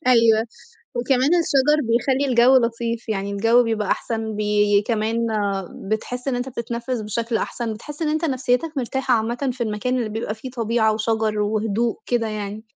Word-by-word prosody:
أيوه. 230 Hz, -2 st, +5 dB, 0.5 s
وكمان 255 Hz, +3 st, +2 dB
الشجر 300 Hz, -3 st, +3 dB
بيخلّي 255 Hz, +4 st, +1 dB
الجَو 250 Hz, +1 st, +5 dB
لطيف، 230 Hz, -1 st, -1 dB
يعني 200 Hz, -2 st, -2 dB
الجَو 225 Hz, +4 st, +4 dB
بيبقى 220 Hz, -3 st, -1 dB
أحسن 220 Hz, -2 st, -2 dB
بي 210 Hz, -1 st, +2 dB
كمان 225 Hz, 0 st, 0 dB, 0.6 s
بتحِس 245 Hz, +4 st, -3 dB
إن 250 Hz, -, 0 dB
أنت 245 Hz, +2 st, -3 dB
بتتنفِّس 235 Hz, 0 st, -4 dB
بشكل 225 Hz, +2 st, -2 dB
أحسن، 230 Hz, -1 st, -3 dB
بتحِس 295 Hz, +8 st, -8 dB
إن 315 Hz, -, +1 dB
أنت 310 Hz, +2 st, 0 dB
نفسيّتك 260 Hz, +1 st, 0 dB
مرتاحة 260 Hz, 0 st, 0 dB
عامةً 240 Hz, +4 st, -1 dB
في 245 Hz, 0 st, -4 dB
المكان 235 Hz, +4 st, -1 dB
اللي 230 Hz, -, -1 dB
بيبقى 215 Hz, 0 st, -3 dB
فيه 255 Hz, +4 st, -8 dB
طبيعة 230 Hz, -2 st, +1 dB
وشجر 220 Hz, -1 st, 0 dB
وهدوء 220 Hz, +2 st, 0 dB
كده 235 Hz, -2 st, 0 dB
يعني. 210 Hz, 0 st, -5 dB
230 Hz, 160 wpm, -22 LUFS, 220-250 Hz, 0.6 s, أيوه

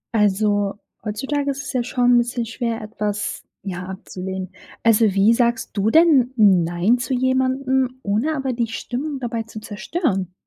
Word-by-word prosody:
Also, 205 Hz, -1 st, +2 dB, 0.3 s
heutzutage 270 Hz, +7 st, -2 dB
ist 275 Hz, +1 st, -5 dB
es 260 Hz, -, -6 dB
ja 250 Hz, -2 st, +1 dB
schon 245 Hz, 0 st, +2 dB
'n 245 Hz, -, +6 dB
bisschen 240 Hz, 0 st, -1 dB
schwer, 230 Hz, 0 st, -3 dB
etwas, 210 Hz, -1 st, -3 dB, 0.2 s
ja, 185 Hz, -2 st, -5 dB
abzulehnen. 190 Hz, 0 st, -6 dB, 0.3 s
Also, 225 Hz, 0 st, +5 dB
wie 200 Hz, +4 st, +5 dB
sagst 235 Hz, -1 st, +1 dB
du 205 Hz, +1 st, +1 dB
denn 290 Hz, -4 st, +5 dB
nein 190 Hz, +1 st, +3 dB
zu 250 Hz, +2 st, -1 dB
jemandem, 260 Hz, 0 st, +1 dB
ohne 225 Hz, +10 st, 0 dB
aber 265 Hz, -2 st, -2 dB
die 235 Hz, -1 st, -1 dB
Stimmung 265 Hz, +5 st, -4 dB
dabei 235 Hz, -2 st, -3 dB
zu 220 Hz, -1 st, -9 dB
zerstören? 210 Hz, -, -2 dB
230 Hz, 155 wpm, -21 LUFS, 205-260 Hz, 0.3 s, n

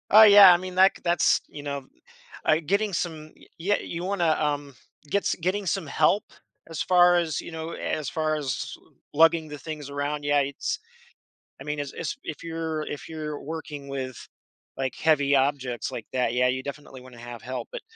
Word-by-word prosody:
Oh, 215 Hz, +2 st, +9 dB
yeah. 205 Hz, -3 st, +10 dB
I -, -, +4 dB
mean, 185 Hz, 0 st, -7 dB
that 190 Hz, +1 st, +5 dB
g -, -, -14 dB
that's, 175 Hz, 0 st, +3 dB
you 145 Hz, -, -10 dB
know, 140 Hz, -2 st, -4 dB, 0.6 s
uh, -, -, +4 dB
uh, -, -, +6 dB
getting 200 Hz, +4 st, +1 dB
some 155 Hz, -3 st, -3 dB, 0.3 s
yeah, 200 Hz, +5 st, +1 dB
you 170 Hz, +1 st, -5 dB
wanna, 180 Hz, -4 st, +1 dB
um, 145 Hz, -2 st, -2 dB, 0.3 s
get 200 Hz, +4 st, +1 dB
s -, -, 0 dB
getting 190 Hz, +4 st, -1 dB
some 190 Hz, -1 st, -1 dB
help 155 Hz, +8 st, +2 dB, 0.5 s
as 165 Hz, -, -4 dB
far 180 Hz, -1 st, +5 dB
as, 165 Hz, -4 st, 0 dB
you -, -, -9 dB
know, 160 Hz, 0 st, -5 dB
as 150 Hz, -4 st, -3 dB
far 155 Hz, -1 st, 0 dB
as, 130 Hz, -8 st, -3 dB
uh, -, -, -26 dB, 0.2 s
lugging 165 Hz, +1 st, +4 dB
the 150 Hz, -1 st, -7 dB
things 150 Hz, -1 st, -7 dB
around, 145 Hz, +1 st, -3 dB
yeah, 145 Hz, 0 st, +3 dB
it's 140 Hz, 0 st, -3 dB, 0.8 s
I -, -, -8 dB
mean, 150 Hz, 0 st, -3 dB
as 145 Hz, -1 st, -5 dB
as -, -, -4 dB
if 155 Hz, -, -6 dB
you're 160 Hz, -1 st, -3 dB
if 145 Hz, -, -7 dB
you're 155 Hz, -2 st, -5 dB
working 150 Hz, -2 st, -7 dB
with, 130 Hz, -2 st, -4 dB, 0.6 s
like, 130 Hz, -2 st, -2 dB
heavy 145 Hz, -3 st, +3 dB
objects 130 Hz, -3 st, -1 dB
like 115 Hz, -, -6 dB
that, 125 Hz, -3 st, +1 dB
yeah, 125 Hz, +1 st, +3 dB
you 130 Hz, +1 st, -1 dB
definitely 140 Hz, -1 st, -8 dB
wanna 125 Hz, -2 st, -14 dB
have 120 Hz, -1 st, -9 dB
help. 130 Hz, +2 st, -5 dB
But, -, -, -6 dB
150 Hz, 195 wpm, -26 LUFS, 140-170 Hz, 0.8 s, yeah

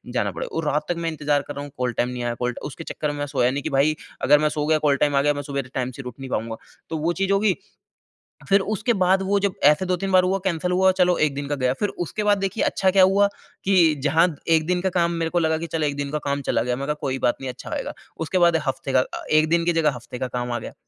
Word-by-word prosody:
जाना -, -, 0 dB
पड़ेगा -, -, -6 dB
और 165 Hz, -, -1 dB
रात 150 Hz, +1 st, 0 dB
तक 175 Hz, -, +1 dB
मैं -, -, +1 dB
इंतज़ार 150 Hz, -2 st, 0 dB
कर 145 Hz, -, -5 dB
रहा 140 Hz, -, -5 dB
हूँ 145 Hz, -, -9 dB
कॉल 125 Hz, -1 st, -1 dB
टाइम 120 Hz, -, 0 dB
नहीं 125 Hz, -1 st, -5 dB
आया 120 Hz, -, -1 dB
कॉल 125 Hz, 0 st, -1 dB
ट -, -, -9 dB
उसके 165 Hz, -, -9 dB
चक्कर 150 Hz, -2 st, -3 dB
में 145 Hz, -, -6 dB
मैं 145 Hz, -, -1 dB
सोया 125 Hz, -3 st, +1 dB
नहीं 140 Hz, +1 st, -3 dB
कि -, -, -2 dB
भई 140 Hz, +2 st, +2 dB, 0.3 s
अगर 150 Hz, -, +5 dB
मैं 150 Hz, 0 st, +2 dB
सो 150 Hz, -1 st, -2 dB
गया 155 Hz, 0 st, +4 dB
कॉल 140 Hz, -, +4 dB
टाइम 145 Hz, 0 st, +1 dB
आ 140 Hz, -, +4 dB
गया 145 Hz, +1 st, +2 dB
मैं 145 Hz, -, -4 dB
सुबेरे 140 Hz, -2 st, -3 dB
टाइम 130 Hz, 0 st, -2 dB
से -, -, -5 dB
उठ 125 Hz, -1 st, -7 dB
नहीं 135 Hz, -1 st, -7 dB
पाऊँगा। 115 Hz, -1 st, -2 dB, 0.3 s
तो 160 Hz, -, -2 dB
वो 165 Hz, +3 st, 0 dB
चीज़ 195 Hz, +2 st, -1 dB
हो 195 Hz, -, +3 dB
गई। 205 Hz, -2 st, +3 dB, 1.0 s
फ़िर 195 Hz, -, +6 dB
उसके 215 Hz, +4 st, 0 dB
बाद 190 Hz, +1 st, +3 dB
वो 200 Hz, +1 st, +1 dB
जब 200 Hz, -1 st, 0 dB
ऐसे 150 Hz, +6 st, +5 dB
2-3 185 Hz, +1 st, -1 dB
बार 185 Hz, -1 st, +5 dB
हुआ 190 Hz, +1 st, +1 dB
कैंसल 180 Hz, 0 st, -1 dB
हुआ 190 Hz, +1 st, +4 dB
चलो 180 Hz, -1 st, +4 dB
1 140 Hz, -, -7 dB
दिन 140 Hz, 0 st, -4 dB
का 145 Hz, -, -1 dB
गया 130 Hz, -2 st, +1 dB
फ़िर 205 Hz, -, 0 dB, 0.2 s
उसके 210 Hz, -, -3 dB
बाद 205 Hz, -1 st, +3 dB
देखिए 195 Hz, +2 st, -1 dB
अच्छा 190 Hz, -1 st, +2 dB
क्या 190 Hz, 0 st, +5 dB
हुआ 195 Hz, +2 st, +4 dB, 0.4 s
कि 180 Hz, -5 st, +4 dB
जहाँ 160 Hz, +4 st, +4 dB, 0.2 s
1 160 Hz, -1 st, +3 dB
दिन 180 Hz, 0 st, +1 dB
का 190 Hz, -, +1 dB
काम 170 Hz, 0 st, +2 dB
मेरे 165 Hz, -, 0 dB
को 175 Hz, -, +2 dB
लगा 160 Hz, -1 st, +1 dB
कि 165 Hz, +1 st, -5 dB
चलो 160 Hz, -2 st, -1 dB
1 140 Hz, -, -2 dB
दिन 140 Hz, 0 st, -3 dB
का 150 Hz, -, -1 dB
काम 140 Hz, 0 st, -1 dB
चला -, -, +1 dB
गया 125 Hz, 0 st, -1 dB
मैंने 140 Hz, +3 st, -5 dB
कहा, 150 Hz, -, +1 dB
"कोई 135 Hz, -3 st, -2 dB
बात 120 Hz, -, +1 dB
नहीं 135 Hz, -, -4 dB
अच्छा -, -, -11 dB
आएगा।" -, -, -4 dB, 0.2 s
उसके 165 Hz, +3 st, -2 dB
बाद 170 Hz, -1 st, +4 dB
हफ़्ते 135 Hz, 0 st, -2 dB
का 130 Hz, -1 st, +4 dB, 0.3 s
1 155 Hz, 0 st, +4 dB
दिन 170 Hz, 0 st, +2 dB
की 175 Hz, -, +2 dB
जगह 160 Hz, -2 st, +2 dB
हफ़्ते 120 Hz, +1 st, -9 dB
का 130 Hz, -, -2 dB
काम 125 Hz, -1 st, -4 dB
आ 120 Hz, -, -1 dB
गया। -, -, -8 dB
155 Hz, 300 wpm, -23 LUFS, 140-180 Hz, 1.0 s, फ़िर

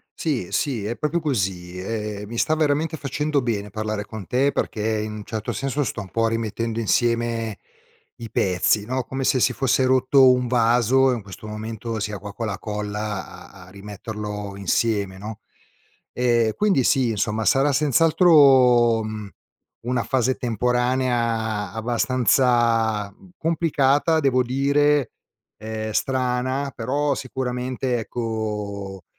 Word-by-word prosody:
Sì, 140 Hz, -, -2 dB
sì, 115 Hz, +1 st, -1 dB
è 115 Hz, -, -2 dB
proprio 155 Hz, +3 st, 0 dB
così. 95 Hz, -, -2 dB
Ehm, 105 Hz, 0 st, -4 dB
mi 115 Hz, +2 st, -7 dB
sta 155 Hz, -, +2 dB
veramente 155 Hz, +1 st, 0 dB
facendo 150 Hz, +1 st, -1 dB
bene 105 Hz, -4 st, -2 dB
parlare 110 Hz, 0 st, -3 dB
con 105 Hz, -1 st, -8 dB
te 135 Hz, +7 st, +1 dB
perché 110 Hz, -3 st, -1 dB
in 105 Hz, 0 st, -5 dB
un 105 Hz, -1 st, -7 dB
certo 110 Hz, -1 st, -4 dB
senso, 135 Hz, +2 st, -2 dB
sto 115 Hz, -, -4 dB
un 95 Hz, -, -10 dB
po' 115 Hz, +3 st, +1 dB
rimettendo 115 Hz, 0 st, -2 dB
insieme 115 Hz, -1 st, 0 dB, 0.6 s
i 115 Hz, -2 st, -8 dB
pezzi 100 Hz, +1 st, +1 dB
no, 130 Hz, +2 st, -2 dB
come 135 Hz, +2 st, -4 dB
se 130 Hz, 0 st, +2 dB
si -, -, +2 dB
fosse 130 Hz, 0 st, +1 dB
rotto 130 Hz, +1 st, +5 dB
un 125 Hz, 0 st, +1 dB
vaso 125 Hz, +2 st, +3 dB
e -, -, +1 dB
in 115 Hz, -, -5 dB
questo 100 Hz, +1 st, -11 dB
momento 110 Hz, +1 st, -5 dB
sia 105 Hz, 0 st, -3 dB
qua 100 Hz, +2 st, -8 dB
con 115 Hz, +2 st, -4 dB
la 100 Hz, -2 st, -3 dB
colla 105 Hz, -3 st, -5 dB
a 95 Hz, -2 st, -14 dB
a -, -, -14 dB
rimetterlo 105 Hz, +1 st, -7 dB
insieme 100 Hz, 0 st, 0 dB
no. 110 Hz, +2 st, -8 dB, 0.7 s
Ehm, 120 Hz, -3 st, +2 dB
quindi 195 Hz, -11 st, +2 dB
sì 130 Hz, -2 st, +3 dB
insomma 110 Hz, +1 st, -1 dB
sarà 135 Hz, +2 st, +3 dB
senz'altro, 135 Hz, -6 st, +5 dB
mhmm, 110 Hz, -2 st, -6 dB, 0.6 s
una 125 Hz, -1 st, 0 dB
fase 130 Hz, -1 st, +1 dB
temporanea 120 Hz, -3 st, 0 dB
abbastanza 115 Hz, -2 st, +1 dB, 0.2 s
complicata 160 Hz, -1 st, +2 dB
devo 130 Hz, -3 st, +3 dB
dire, 140 Hz, +2 st, +2 dB, 0.5 s
ehm, 110 Hz, 0 st, -5 dB
strana 130 Hz, +3 st, -1 dB
però, 140 Hz, +5 st, 0 dB
sicuramente 130 Hz, -1 st, -3 dB
ecco, 105 Hz, -5 st, -4 dB
115 Hz, 140 wpm, -23 LUFS, 105-130 Hz, 0.7 s, rotto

